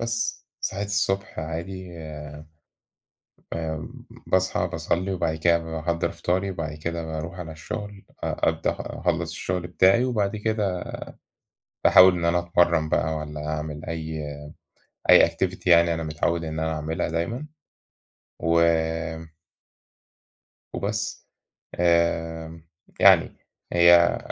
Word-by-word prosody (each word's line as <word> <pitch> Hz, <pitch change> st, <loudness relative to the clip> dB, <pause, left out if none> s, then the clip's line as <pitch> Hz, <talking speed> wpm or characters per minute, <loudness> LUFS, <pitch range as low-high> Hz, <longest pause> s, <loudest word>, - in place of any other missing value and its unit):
بس 115 Hz, 0 st, -2 dB
صحيت 100 Hz, +2 st, -2 dB
الصبح 100 Hz, -2 st, -1 dB
عادي 85 Hz, +2 st, -6 dB, 1.6 s
آمم 80 Hz, -1 st, -5 dB, 0.2 s
باصحى 95 Hz, 0 st, +1 dB
باصلّي 95 Hz, +3 st, -2 dB
وبعد 85 Hz, -3 st, -1 dB
كده 85 Hz, +1 st, +3 dB
باحضّر 80 Hz, 0 st, -2 dB
فطاري 95 Hz, +2 st, -1 dB
وبعد 80 Hz, -4 st, -4 dB
كده 85 Hz, +2 st, -4 dB
باروح 80 Hz, +3 st, -5 dB
على 80 Hz, -2 st, -6 dB
الشُغل، 100 Hz, +6 st, -7 dB, 0.2 s
أ -, -, 0 dB
أبدأ -, -, 0 dB
أخلّص 85 Hz, -1 st, -2 dB
الشُغل 90 Hz, +2 st, -3 dB
بتاعي 95 Hz, +8 st, +4 dB
وبعد 110 Hz, -5 st, 0 dB
كده 105 Hz, -4 st, -1 dB, 1.0 s
باحاول 95 Hz, 0 st, +8 dB
إن 85 Hz, -, -2 dB
أنا 85 Hz, +1 st, +3 dB
أتمرّن 85 Hz, -2 st, +2 dB
بقى 80 Hz, 0 st, 0 dB
والّا 75 Hz, 0 st, -6 dB
أعمل 75 Hz, 0 st, -4 dB
أي 80 Hz, -1 st, -4 dB, 0.9 s
أي -, -, +8 dB
activity 95 Hz, -1 st, -3 dB
يعني 85 Hz, -1 st, +5 dB
أنا 80 Hz, -, -3 dB
متعوّد 80 Hz, +2 st, -1 dB
إن 80 Hz, 0 st, -4 dB
أنا 80 Hz, 0 st, -1 dB
أعملها 80 Hz, +3 st, -2 dB
دايمًا 100 Hz, -, -3 dB, 0.9 s
و 85 Hz, 0 st, +2 dB, 2.1 s
وبس، -, -, -3 dB, 0.5 s
آآ 80 Hz, -1 st, 0 dB, 0.4 s
يعني -, -, +6 dB, 0.4 s
هي 85 Hz, 0 st, +6 dB
85 Hz, 110 wpm, -25 LUFS, 80-95 Hz, 2.1 s, باحاول